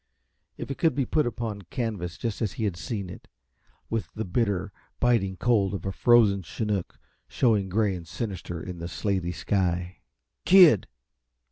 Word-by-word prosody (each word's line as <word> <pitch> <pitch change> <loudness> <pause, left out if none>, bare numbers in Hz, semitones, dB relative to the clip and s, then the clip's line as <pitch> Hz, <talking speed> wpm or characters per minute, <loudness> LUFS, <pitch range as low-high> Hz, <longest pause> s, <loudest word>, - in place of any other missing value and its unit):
If - - -6
it 135 - -5
could 165 -2 +2
be 140 -2 +1
put 150 +2 +1
upon 115 -4 -4
canvas 100 -8 -3
just 115 -2 -4
as 105 -4 -1
he 115 - -4
had 100 -5 0
seen 95 +5 -4
it, 85 - -11 0.6
with 115 -1 -3
the 110 - -3
bitter, 100 -1 -1 0.3
biting 110 -6 +2
cold 105 -4 +2
of 95 - -6
a 95 - -1
frozen 110 -2 +4
chinook 100 0 -3 0.3
showing 105 -6 +1
gray 105 +1 +1
and 85 -2 -7
sinister 90 -6 -5
in 90 -2 -7
the 85 - -4
slaty 90 0 -1
sky 90 -2 -1 0.5
"Kid!" 175 - +7
100 Hz, 160 wpm, -26 LUFS, 90-115 Hz, 0.6 s, Kid